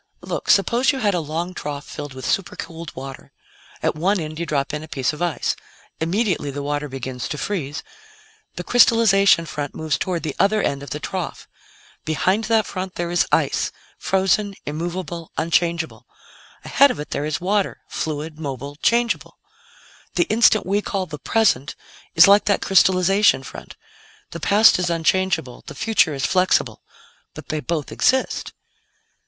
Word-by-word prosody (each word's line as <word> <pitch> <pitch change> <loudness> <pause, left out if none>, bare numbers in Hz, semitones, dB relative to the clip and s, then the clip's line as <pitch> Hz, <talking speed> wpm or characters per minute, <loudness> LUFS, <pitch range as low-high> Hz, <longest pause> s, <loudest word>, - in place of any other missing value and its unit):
Look, - - -5
suppose 235 +8 +4
you 275 - -4
had 210 -6 +1
a 175 - +1
long 165 +3 -4
trough 145 -4 -6
filled 145 -2 -8
with 130 -1 -7
supercooled 170 -4 -3
water. 135 0 -9 0.5
At - - +2
one 190 +6 +1
end, 155 -1 -6
you 170 - -3
drop 140 -2 -1
in 150 - -3
a 155 - -9
piece 135 0 -1
of 150 - -9
ice. 175 -3 0 0.4
Immediately 180 -1 0
the 140 +1 -5
water 145 0 -2
begins 130 -1 -5
to 150 - -4
freeze; 150 -4 -3 0.7
the 180 - -5
crystallization 200 -6 +5
front 145 -2 -5
moves 160 -1 -1
toward 180 -3 -2
the 155 -3 -3
other 215 +2 +3
end 140 -8 -1
of 140 - -8
the 150 - -4
trough. 180 +2 -5 0.6
Behind 185 +8 0
that 220 0 +2
front, 185 -1 -5
there 175 0 -3
is 175 - +2
ice - - +1 0.3
frozen, 195 +1 +1
immovable, 170 +2 -5
unchangeable. 170 0 0 0.6
Ahead 280 +1 +5
of 250 - -4
it 150 - -7
there 145 - -2
is 155 - -2
water 200 +2 -1
fluid, 155 0 -4
mobile, 140 -1 -6
changeable. 235 +7 0 0.8
"The - - +4
instant 220 -1 +4
we 200 +2 +1
call 195 -2 -2
'the 150 -4 -8
present' 165 - +1 0.4
is 165 - +8
like 200 +1 +6
that 200 - +1
crystallization 190 -3 +4
front. - - -10 0.6
The 170 - -6
past 205 +3 +5
is 180 -1 0
unchangeable; 170 -5 0
the - - -8
future 210 -9 +2
is 135 - -1
flexible. 185 0 +1 0.5
But - - -10
they 155 - -1
both 155 -1 -3
exist." 260 0 0
170 Hz, 160 wpm, -21 LUFS, 150-195 Hz, 0.8 s, is